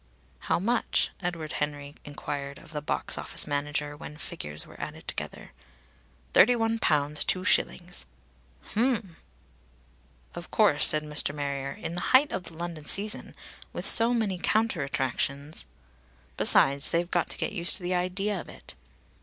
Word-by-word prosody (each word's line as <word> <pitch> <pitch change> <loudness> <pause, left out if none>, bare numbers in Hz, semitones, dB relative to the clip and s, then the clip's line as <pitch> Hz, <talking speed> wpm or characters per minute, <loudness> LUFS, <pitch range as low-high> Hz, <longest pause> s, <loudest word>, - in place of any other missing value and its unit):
"How - - +4
much?" 230 +7 +1
Edward 170 -4 -3
Henry 145 -1 -3
enquired 145 -1 -5
of 155 - -15
the 150 -1 -3
box 150 - -1
office - - -2
manager 145 0 -2
when 150 0 -9
figures 75 - -4
were - - -12
added - - -7
together. - - -5 0.8
"Thirty 245 +5 +7
one 225 -1 0
pounds 150 -3 +2
two 185 0 0
shillings." 65 0 0 0.7
"Hem!" 220 -7 0 1.2
"Of - - -8
course," - - +4
said 155 0 +4
Mr. 150 -1 +1
Marrier. 140 -1 -3
"In 165 - -6
the 175 - -2 0.2
height 285 +2 -1
of 185 -1 -3
the 165 - -10
London 170 -3 -6
season, 210 +2 0 0.4
with - - -4
so 230 +1 +7
many 215 -6 0
counter 215 -4 +1
attractions! 140 +2 -2 0.7
Besides, 140 +1 +5
they've 170 +1 0
got 175 - +1
to - - -3
get - - -2
used 175 -3 +3
to 185 - 0
the 180 +1 -1
idea 185 +2 -1
of - - -13
it." - - -8
165 Hz, 155 wpm, -28 LUFS, 145-190 Hz, 1.2 s, Thirty